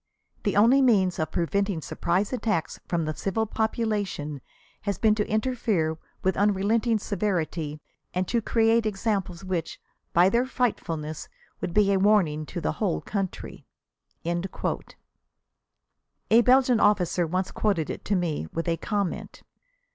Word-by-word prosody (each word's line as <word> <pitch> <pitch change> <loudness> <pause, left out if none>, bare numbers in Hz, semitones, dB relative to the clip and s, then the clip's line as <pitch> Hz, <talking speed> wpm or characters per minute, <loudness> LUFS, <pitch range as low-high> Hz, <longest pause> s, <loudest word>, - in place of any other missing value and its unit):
] - - -40
"The 205 - +1
only 240 +6 +6
means 195 -8 +3
of 155 - 0
preventing 195 +1 0
surprise 180 - -1
attacks 215 -9 -1
from 170 -2 0
the 155 - -2
civil 200 +7 -1
population 210 - -2 0.4
has 200 -3 -2
been 220 -2 +4
to 210 -1 -1
interfere 215 -9 0 0.2
with 190 - +2
unrelenting 210 +3 +2
severity 175 -7 -2 0.3
and 185 0 -1
to 235 - +1
create 225 0 +2
examples 195 -4 -2
which, 180 -4 -3 0.3
by 175 +2 +5
their 235 +6 +2
frightfulness, 165 - -2 0.3
would - - -3
be 205 -1 +4
a 195 - +2
warning 180 -7 +3
to - - -5
the 75 - -1
whole 80 - +1
country." 195 -3 -5 0.6
A 170 +1 0 2.0
Belgian 250 0 +4
officer 180 -4 +2
once 185 +3 -1
quoted 190 -8 0
it - - -7
to 205 - +1
me, 165 - -1
with 165 +1 -3
a 165 -1 +1
comment. 200 -3 -3
195 Hz, 140 wpm, -26 LUFS, 170-220 Hz, 2.0 s, only